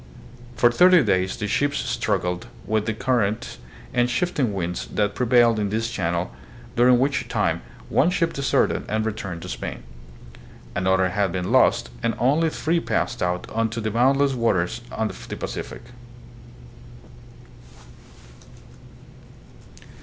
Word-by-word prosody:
For 120 0 +4
thirty 180 +4 +6
days 95 -3 0
the 105 - -3
ships 145 +7 0
struggled 100 -8 -1 0.2
with 110 +1 0
the 110 - 0
currents 115 -2 -1 0.3
and 120 0 +2
shifting 140 -5 0
winds 90 -3 -3
that 105 -1 -1
pre 125 - -1
vail 120 -2 +5
in 105 -1 -1
this 115 +2 -2
channel,, 85 -3 -2 0.4
during 125 +1 +5
which 135 +3 0
time - - 0 0.3
one 160 - +3
ship 165 -2 0
deserted 140 0 +1
and 110 0 0
returned 95 -6 -4
to - - -7
Spain; - - -6 0.9
another 95 0 +2
had 100 0 0
been 90 0 -3
lost, - - +3
and 115 0 0
only 150 +6 +2
three 165 +2 0
passed 120 -7 -2
out 90 0 -1
onto 115 +1 -1
the 110 -1 -2
boundless 135 +4 +3
waters 115 -3 0
of 110 -1 -4
the - - -5
Pacific. - - -6
115 Hz, 130 wpm, -23 LUFS, 95-125 Hz, 0.9 s, thirty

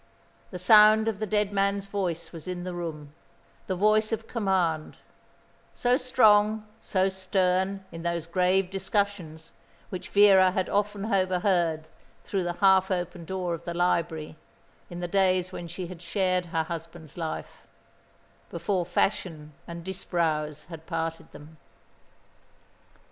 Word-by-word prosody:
The 180 - -6
sound 215 +3 +6
of 215 -3 -1
the 215 - -2
dead 210 -1 0
man's 200 0 +1
voice 180 -5 -3
was 165 -1 -10
in 180 -1 -4
the 180 0 -5
room, 155 -4 -6 0.5
the 185 - -1
voice 215 +3 +3
of 225 0 -3
command 185 -8 -1 0.8
so 245 0 +2
strong, 220 -5 +3 0.2
so 190 -1 +1
stern 190 0 0
in 165 0 -8
those 170 -1 -2
grave 185 +2 +1
discussions 190 -5 -2 0.4
which 185 -2 -6
Vera 195 -2 +6
had 185 0 -2
often 205 0 -1
overheard 180 -5 +1 0.4
through 195 - -2
the 175 - -1
half 190 0 +4
open 175 -2 -3
door 180 0 -3
of 165 0 -6
the 170 0 -5
library, 165 -3 -1 0.5
in 175 0 -7
the 175 - -2
days 185 -1 +2
when 175 -2 -7
she 175 +2 -6
had 175 -1 -10
shared 185 0 0
her 165 -1 -1
husband's 165 -1 -8
life 165 -2 -6 0.8
before 170 +1 -2
fashion 160 -5 -1
and 170 0 -7
Disbrowes 165 -5 -2
had 165 -2 -11
parted 165 0 -4
them. 155 +2 -14
185 Hz, 140 wpm, -27 LUFS, 170-195 Hz, 0.8 s, sound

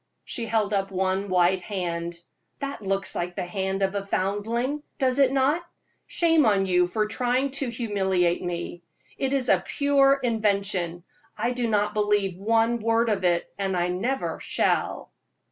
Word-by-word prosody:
She 230 -2 -4
held 215 -2 0
up 195 -1 0
one 190 +1 -1
white 180 0 +3
hand. 170 -3 -4 0.4
"That 280 -4 -5
looks 195 0 -1
like 175 0 -3
the - - -3
hand 190 +1 -2
of 190 0 +1
a 200 -1 -2
foundling, 225 +9 -1 0.2
does 260 -1 +1
it 270 -2 +5
not? 275 +5 +2 0.4
Shame 330 -3 +3
on 200 -5 +3
you 180 -1 +3
for 215 +4 0
trying 250 +5 0
to 265 - -1
humiliate 190 -7 0
me! 175 0 -4 0.4
It 270 -1 0
is 270 -2 +1
a - - +3
pure 275 -1 +3
invention. 200 -7 0 0.3
I 240 - 0
do 245 -2 -1
not 210 -1 +1
believe 205 -3 +1
one 225 +4 +1
word 230 +1 +2
of 205 -3 0
it, 175 -1 +1
and 190 -2 -1
I 175 0 +1
never 240 +10 -2
shall." - - -1
205 Hz, 160 wpm, -25 LUFS, 185-245 Hz, 0.4 s, it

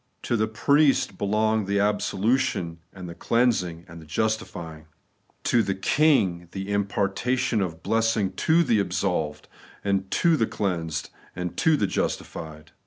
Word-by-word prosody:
To 120 - 0
the 110 -1 +1
Priest 140 +6 +2
belong 110 +1 +1
the 100 +1 0
absolution 105 -3 0
and 90 -1 -9
the 85 - -7
cleansing 90 -7 0
and 85 -2 -11
the - - -13
justifying; 80 -5 -3 0.6
to 120 - +3
the 95 -2 -1
King, 95 - +2
the 95 +1 -4
impartation 100 +4 0
of 80 -3 -4
blessing 110 -2 +1
to 165 - +3
the 120 -8 +2
absolved 90 -6 -1 0.4
and 95 -1 0
the 160 - +2
cleansed 85 -6 -3 0.2
and 90 -1 -4
the 155 -9 +3
justified. 80 -4 -4
100 Hz, 130 wpm, -25 LUFS, 90-115 Hz, 0.6 s, to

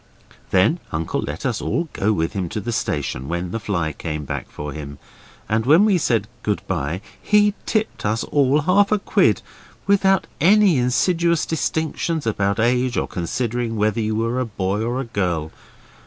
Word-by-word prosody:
Then 100 - +3
Uncle 80 0 -2
let 75 - -5
us 120 -4 -1
all 170 0 -1
go 105 +3 +1
with 80 -5 -1
him 95 -4 -2
to 110 - -3
the 120 +3 -4
station 70 - -2
when 85 +1 -3
the 115 - -2
fly 85 -8 -2
came 75 -1 -5
back - - -5
for 75 -1 -6
him; 70 -1 -7 0.5
and 110 +1 +1
when 165 +8 +6
we 200 -4 +3
said 115 -8 +1
good 105 -1 -1
bye 75 +8 -2 0.2
he 210 -1 +4
tipped 220 -1 -1
us 110 +2 0
all 145 +1 +2
half 200 +6 +3
a 215 - +4
quid, 195 - +2 0.4
without 195 -1 +3
any 190 -1 +5
insidious 165 +8 +2
distinctions 160 -1 -1
about 100 -2 0
age 125 +2 +2
or - - 0
considering 115 +6 -2
whether 110 +1 +1
you 110 0 -1
were 115 +3 0
a 130 - 0
boy 100 -1 -2
or 120 +3 -1
a 135 - -3
girl. 90 -8 -2
115 Hz, 175 wpm, -21 LUFS, 95-155 Hz, 0.5 s, when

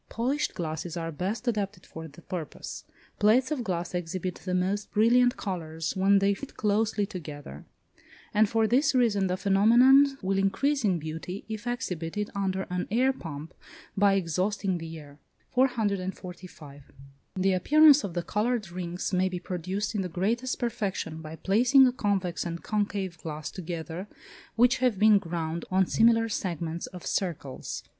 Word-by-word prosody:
Polished 265 +6 -1
glasses 165 0 -4
are 165 -1 -3
best 195 - -4
adapted 205 -5 -2
for 160 0 -9
the 155 +3 -15
purpose. 170 -5 -6 0.3
Plates 240 +6 +4
of 275 -5 -1
glass 175 -4 -3
exhibit 180 +1 -3
the 185 -1 -1
most 195 +3 -1
brilliant 245 +3 +4
colours 165 -5 -4
when 195 +1 +4
they 195 +1 +3
fit 280 +7 -9
closely 210 0 +1
together, 145 - -9 0.7
and 210 0 +4
for 225 0 +2
this 260 +5 +2
reason 210 -6 +3
the 180 0 -1
phenomenon 240 +9 +5
will 195 +1 +1
increase 275 +9 +1
in 190 -4 +2
beauty 165 +5 -6
if 220 +2 -6
exhibited 205 -5 -3
under 190 -1 -1
an 180 0 -2
air 255 +5 +2
pump, 155 - -8 0.4
by 200 0 +4
exhausting 185 +1 -1
the 165 0 -7
air. 145 -1 -13 0.3
445. 190 - -2 0.5
The 190 0 +2
appearance 295 - +6
of 180 -4 -5
the 175 - -1
coloured 210 0 -1
rings 175 +1 -4
may 185 +1 +2
be 180 -1 -4
produced 185 +4 -3
in 210 - -1
the 185 - -3
greatest 230 +9 -1
perfection 200 -8 -3
by 155 0 -8
placing 245 - +5
a 250 - +3
convex 195 -7 -1
and 170 -1 -5
concave 200 -4 -2
glass 155 -1 -6
together 170 +1 -6 0.5
which 245 +3 +4
have 250 -5 +2
been 210 0 +6
ground 165 -2 -4
on 190 0 +3
similar 225 +3 +4
segments 170 -5 -3
of 180 -2 -10
circles. 160 -8 -3
190 Hz, 155 wpm, -28 LUFS, 170-220 Hz, 0.7 s, appearance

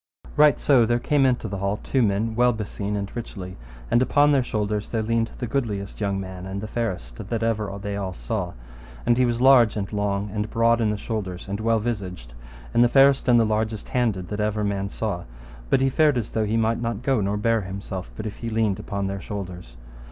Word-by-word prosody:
Right 150 -1 +6
so 125 -6 +4
came 135 +2 +2
into 125 -3 0
the 100 -2 -4
hall 100 +1 -1
two 130 - 0
men 110 +1 +1
well 125 +2 +3
beseen 105 -1 -4
and 100 -1 -4
richly, 95 -6 -6 0.4
and 120 - +4
upon 145 +3 +4
their 140 -2 +4
shoulders 105 -3 -2
there 115 -2 -1
leaned 115 +1 0
the 125 - -3
goodliest 110 -6 -3
young 100 -1 0
man 95 -1 -7
and 95 +1 -4
the 110 - -5
fairest 90 - -4
that 115 +3 -3
ever 110 -3 0
they 100 0 -4
all 95 -2 -4
saw, 95 -5 -3 0.5
and 120 - +4
he 125 - +4
was 120 0 -1
large 130 -4 +6
and 100 0 -4
long, 100 -1 -1
and 105 0 -2
broad 115 +1 +3
in 110 - +2
the 105 - -1
shoulders, 100 -5 -4
and 100 +1 -3
well 115 0 +2
visaged, 95 - -4 0.4
and 120 - +5
the 120 - +4
fairest 135 +1 +5
and 120 -1 +6
the 115 - +4
largest 110 0 -1
handed 110 -8 0
that 105 - -4
ever 105 0 0
man 100 -1 -1
saw, 105 -5 -3 0.4
but 130 - +3
he 135 - +3
fared 150 0 +3
as 115 -3 -3
though 110 -1 0
he 110 +2 0
might 115 +1 +1
not 115 -1 -3
go 130 -4 +2
nor 100 +1 0
bear 115 +1 +2
himself 95 -1 -6
but 110 - -6
if 105 - -5
he 115 - -4
leaned 110 -3 0
upon 100 -1 -3
their 95 0 -3
shoulders. 90 -10 -7
110 Hz, 220 wpm, -24 LUFS, 100-115 Hz, 0.5 s, Right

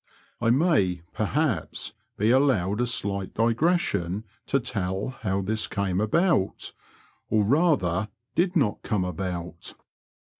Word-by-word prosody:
I 115 - +2
may, 115 - +2
per 110 - -1
haps, 135 - -1 0.2
be 110 +3 +3
allowed 120 -6 +3
a 125 - +1
slight 100 -5 -2
digression 115 - +1 0.2
to 140 - +2
tell 100 -4 -2
how 100 -2 -1
this 110 +3 0
came 100 -1 -1
about 145 - +1 0.3
— - - -34
or, 110 -1 +3
rather, 110 - +2 0.2
did 180 +2 +1
not 130 -11 +1
come 100 -4 -1
about. 90 -1 -5
105 Hz, 125 wpm, -26 LUFS, 95-130 Hz, 0.3 s, be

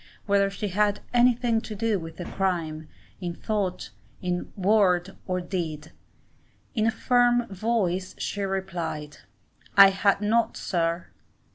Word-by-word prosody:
whether 200 -1 +3
she 200 +1 -4
had 205 +2 +1
anything 240 -1 +3
to 215 - -7
do 215 -1 0
with 165 -1 -9
the 175 - -5
crime, 165 -6 -2 0.3
in 175 -2 -4
thought, 200 - -2 0.6
word, 190 -2 +2
or 180 -1 0
deed? 170 -4 -4 0.8
In 220 -3 +1
a - - +3
firm 245 +1 +3
voice 190 -3 -1
she 205 - -3
replied, 175 -6 -3 0.6
'I 200 0 +11
had 195 +1 +2
not, 220 +2 +1
sir. 170 -1 -1
195 Hz, 125 wpm, -26 LUFS, 175-215 Hz, 0.8 s, I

